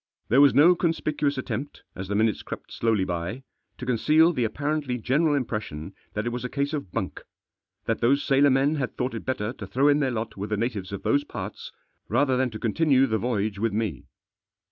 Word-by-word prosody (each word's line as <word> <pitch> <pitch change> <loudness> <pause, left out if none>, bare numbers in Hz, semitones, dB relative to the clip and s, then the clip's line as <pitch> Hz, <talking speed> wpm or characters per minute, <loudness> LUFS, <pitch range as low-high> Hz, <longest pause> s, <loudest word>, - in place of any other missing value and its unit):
There 130 +5 +6
was 140 -5 +6
no 160 +6 +7
conspicuous 155 -4 0
attempt, 130 +2 -5
as 95 +1 -6
the 100 - -2
minutes 110 0 +2
crept - - -8
slowly 110 -4 +1
by, 90 +7 -4 0.3
to 125 - -6
conceal 155 +8 +4
the 125 -6 0
apparently 145 +2 -2
general 145 +6 +2
impression 105 - -4 0.2
that 105 +1 -2
it 120 - -1
was 125 +1 -4
a 125 - -3
case 140 +2 -2
of 140 - -4
bunk; - - -4 0.6
that 115 - -1
those 140 +4 +3
sailor 140 +1 +4
men 140 +3 +2
had 130 -3 -3
thought 125 0 -1
it 115 - -6
better 120 -3 -2
to - - -8
throw 140 +3 +3
in 145 0 +4
their 135 -3 +1
lot 115 -2 -4
with 100 +2 -5
the 105 - 0
natives 105 -4 -3
of 100 - -6
those 145 0 +2
parts, - - -7 0.4
rather 135 -3 +2
than 130 0 +1
to 110 - -7
continue 135 +4 +3
the 110 -4 0
voyage 110 -4 -1
with 115 -1 0
me. 110 -2 -2
125 Hz, 210 wpm, -26 LUFS, 110-140 Hz, 0.6 s, no